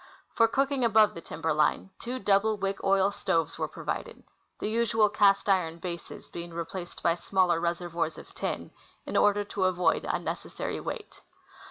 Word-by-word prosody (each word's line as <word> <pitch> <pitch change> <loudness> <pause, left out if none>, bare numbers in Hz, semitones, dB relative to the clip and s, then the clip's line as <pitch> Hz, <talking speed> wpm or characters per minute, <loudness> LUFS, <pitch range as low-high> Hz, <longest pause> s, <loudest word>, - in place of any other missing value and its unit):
For 230 - +5
cooking 275 +2 +1
above 220 -2 +5
timber 160 +1 -2
line, 150 +5 +1
two 245 +2 -4
double 210 -1 +2
wick 195 0 -2
oil 195 0 +3
stoves 165 -4 -1
were - - 0
provided, - - -5 0.3
the - - -3
usual 225 -1 +2
cast 200 -1 +4
iron 180 -4 +2
bases 170 0 -7
being 170 0 -7
replaced 175 +1 -6
b}^ 170 0 +2
smaller 180 -3 +2
reservoirs 170 -1 -2
of - - -12
tin, - - -4 0.3
in - - -5
order 205 0 +4
to 200 -1 -1
avoid 180 -1 +2
unnecessary - - -3
weight. 450 -4 -7
195 Hz, 155 wpm, -28 LUFS, 170-215 Hz, 0.3 s, For